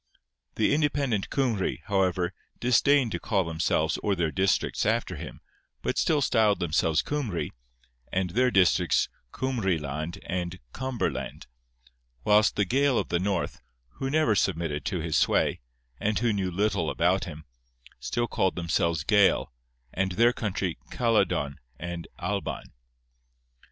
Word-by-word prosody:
The 110 - +2
independent 145 -8 +1
Cymry, 115 - 0
however, 95 -3 +1 0.3
disdained 125 +1 +3
to - - -2
call 100 -5 +1
themselves 80 -1 0
or 100 - 0
their 85 -3 0
districts 95 +2 +1
after - - 0
him, - - -8 0.4
but - - 0
still 150 -3 +2
styled 105 -5 +3
themselves 80 -2 +1
Cymry, 130 - -2 0.6
and 90 -2 0
their 125 +6 +3
districts 90 -4 +3 0.2
Cumrie 115 -9 0
land 75 +3 -4
and 90 0 -3 0.2
Cumberland; 130 -1 -3 0.8
whilst 105 +5 +4
the 105 - +2
Gael 135 +4 +2
of - - -1
the 85 - +1
North, 95 -1 -2 0.3
who 135 - -4
never 150 -6 +3
submitted 80 -7 -1
to 90 -4 -1
his 80 -1 0
sway, - - +2 0.4
and 105 0 0
who 115 -1 +1
knew 95 -2 -1
little 100 -2 0
about 90 +3 +1
him, 80 -3 -9 0.5
still 120 - -1
called 95 -2 0
themselves 85 -2 0
Gael, 100 - +3 0.4
and 95 -1 0
their 120 +5 +4
country 95 -6 -2
Caledon 110 - +1 0.2
and 85 0 -6
Alban. - - -4
95 Hz, 135 wpm, -27 LUFS, 85-115 Hz, 0.8 s, whilst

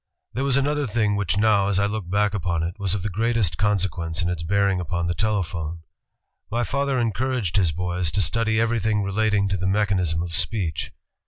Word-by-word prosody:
*' - - -56
There 130 - -2
was 140 -1 +2
another 145 0 0
thing 105 -2 +1
which 100 -1 0
now, 105 -2 +3
as 100 -2 +1
I 100 - +3
look 100 -3 -3
back 105 +2 +1
upon 85 -4 -1
it, 85 +1 -2
was 100 -1 0
of 95 - -4
the 105 - -1
greatest 110 -5 0
consequence 90 -4 0
in 85 - 0
its 90 -2 -3
bearing 100 +2 +1
upon 85 0 -2
the 85 - 0
telephone. 85 -6 -2 0.7
My 120 +3 0
father 140 +4 0
encouraged 120 -3 -1
his 90 -5 +3
boys 90 0 -1
to 100 - +3
study 110 +6 +1
everything 110 -2 +1
relating 100 0 +1
to 100 - 0
the 95 +1 -2
mechanism 95 -5 +1
of 85 -1 -5
speech. 85 -2 0
100 Hz, 200 wpm, -23 LUFS, 85-110 Hz, 0.7 s, now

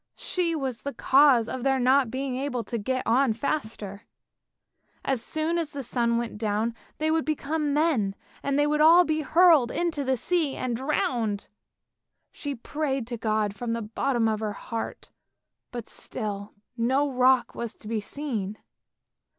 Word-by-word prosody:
she 345 -2 -1
was 265 -6 -3
the 280 - -5
cause 265 -4 +5
of 260 - -4
their 270 +1 +2
not 260 0 +4
being 260 +1 -3
able 255 -2 -2
to 235 - -4
get 255 +5 -2
on 245 +1 +3
faster; 220 -6 -3 1.0
as 265 -4 0
soon 320 +2 -1
as 315 -3 -3
the 280 -1 -4
sun 235 -1 +1
went 235 -3 -4
down 215 +1 0 0.2
they 310 +1 +1
would 320 0 +2
become 305 0 -1
men, 280 -10 +1 0.3
and 280 0 0
they 290 - +4
would 300 0 +1
all 335 +3 +8
be 310 -1 0
hurled 320 -4 +5
into 330 -3 -1
the 260 -1 +1
sea 320 +1 0
and 245 -2 -2
drowned. 235 -6 -1 0.8
She 285 -1 -5
prayed 270 0 -2
to 240 - -3
God 215 -2 0
from 230 +3 -3
the 230 - -2
bottom 230 +2 0
of 215 -1 0
her 215 -1 -2
heart, 225 +2 -6 0.6
but 240 -2 -6
still 205 -3 -5 0.2
no 260 +5 +2
rock 255 -1 +3
was 235 -2 -5
to 210 - -10
be 220 -1 -1
seen! 215 -6 -3
255 Hz, 165 wpm, -26 LUFS, 225-290 Hz, 1.0 s, all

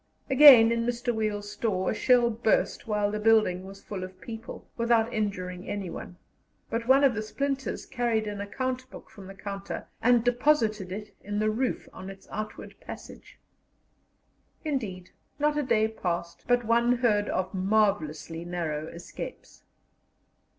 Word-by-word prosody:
Again, 260 -5 +9
in 230 0 +1
Mr. 240 0 -1
Wiel's 205 -2 -2
store 205 -3 -1
a - - -1
shell 240 +1 +4
burst 220 0 0
while 210 -1 +1
the 210 - -2
building 210 -4 +3
was 195 0 -12
full 195 -3 -5
of 185 0 -9
people, 225 +2 -8
without 235 0 +2
injuring 185 -4 -3
anyone; 185 -3 -5 0.5
but 230 +1 -2
one 270 +2 +6
of 270 -3 +5
the 215 - -2
splinters 275 +5 -3
carried 240 -4 0
an 205 -1 -4
account 255 +5 -3
book - - -12
from 200 -4 -12
the 195 - -10
counter 200 0 -6 0.2
and 240 -1 +4
deposited 240 -6 +2
it 210 +2 -7
in 205 +1 -3
the 215 +1 +2
roof 250 +4 -2
on 190 +1 -8
its 195 0 -12
outward 215 0 -6
passage. - - -11 1.3
Indeed, 210 - -3 0.3
not 295 0 +1
a 295 - +1
day 230 -5 +2
passed 175 -5 -4
but 245 0 +2
one 235 +2 +3
heard 210 -4 +2
of 185 +1 -2
marvellously 185 -5 0
narrow 165 -3 -3
escapes. 170 +2 -9
215 Hz, 150 wpm, -28 LUFS, 195-240 Hz, 1.3 s, Again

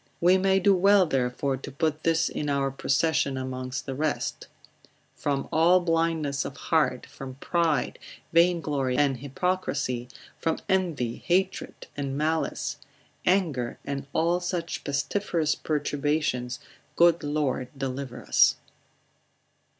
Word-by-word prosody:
We 180 +2 +5
may 190 0 +3
do 195 +1 +5
well 195 +1 +5
therefore 135 -1 0
to 135 - -8
put 155 +2 -1
this 165 0 +2
in 150 - -3
our 140 -1 +1
procession 140 0 +1
amongst 130 0 -4
the 135 - -4
rest; 150 +2 -2 0.7
From 140 -1 -2
all 170 +3 +5
blindness 165 -5 0
of - - -7
heart, - - +1
from 130 -1 -9
pride, 160 -2 0 0.3
vainglory, 160 -7 +2
and 140 -3 +2
hypocrisy, 140 -4 -2 0.3
from 165 - 0
envy, 170 - 0
hatred 190 +2 -1
and 140 -1 -3
malice, 155 +2 -1 0.5
anger, 160 -11 +1
and 140 -1 -4
all 170 +3 +2
such 175 -1 -3
pestiferous 155 +2 0
perturbations, 145 -4 -1 0.4
good 170 -1 +5
Lord 145 -4 -1
deliver 135 -1 -4
us. - - +5
150 Hz, 120 wpm, -27 LUFS, 135-170 Hz, 0.7 s, We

